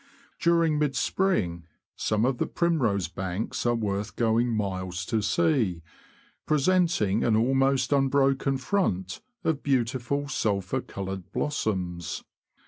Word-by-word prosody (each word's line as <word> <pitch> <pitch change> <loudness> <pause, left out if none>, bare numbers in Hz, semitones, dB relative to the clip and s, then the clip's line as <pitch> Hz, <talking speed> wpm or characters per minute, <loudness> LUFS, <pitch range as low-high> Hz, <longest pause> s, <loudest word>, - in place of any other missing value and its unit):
During 165 -3 +3
mid 145 -3 0
spring, 90 - 0 0.3
some 110 +1 +1
of 125 -1 0
the - - 0
primrose 120 - +1
banks 95 +7 -3
are 120 - +3
worth 105 -1 -2
going 115 +1 +2
miles 95 -4 -2
to 110 -3 0
see, 115 - +1 0.6
presenting 155 - +2
an 115 - +3
almost 135 +3 +2
unbroken 135 0 +2
front 130 - -1 0.2
of 155 -3 0
beautiful 130 +1 0
sulphur 100 -9 -1
coloured 95 -1 -6
blossoms. 95 - -2
120 Hz, 115 wpm, -27 LUFS, 100-140 Hz, 0.6 s, During